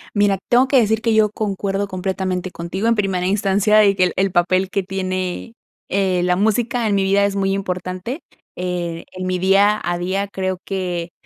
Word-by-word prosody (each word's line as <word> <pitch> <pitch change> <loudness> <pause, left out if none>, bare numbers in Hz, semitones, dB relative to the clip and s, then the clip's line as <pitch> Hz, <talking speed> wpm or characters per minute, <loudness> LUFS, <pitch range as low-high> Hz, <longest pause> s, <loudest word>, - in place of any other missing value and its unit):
Mira, 205 -1 +3
tengo 250 +2 +5
que 270 - +3
decir 220 -2 +2
que 230 -1 +1
yo 215 -1 +4
concuerdo 200 -1 -2
completamente 185 -1 -3
contigo, 180 +6 -3
en 230 - +3
primera 190 -4 0
instancia, 205 +2 +3
y 200 -1 +3
que 185 - +2
el 180 - -2
el 195 0 +1
papel 185 +1 +2
que 195 0 -1
tiene, 185 +2 -3 0.4
eh, 190 -2 +1
la 180 0 +2
música 225 +4 +1
en 205 - +1
mi 195 - +2
vida 200 +1 +3
es 200 0 -1
muy 195 0 +1
importante. 185 - -4 0.4
Eh, 175 -2 -3
en 185 0 -5
mi 185 0 -1
día 200 +3 +4
a 175 0 -2
día, 190 +3 -2
creo 185 -1 -3
que 180 -3 -3
195 Hz, 190 wpm, -20 LUFS, 185-205 Hz, 0.4 s, tengo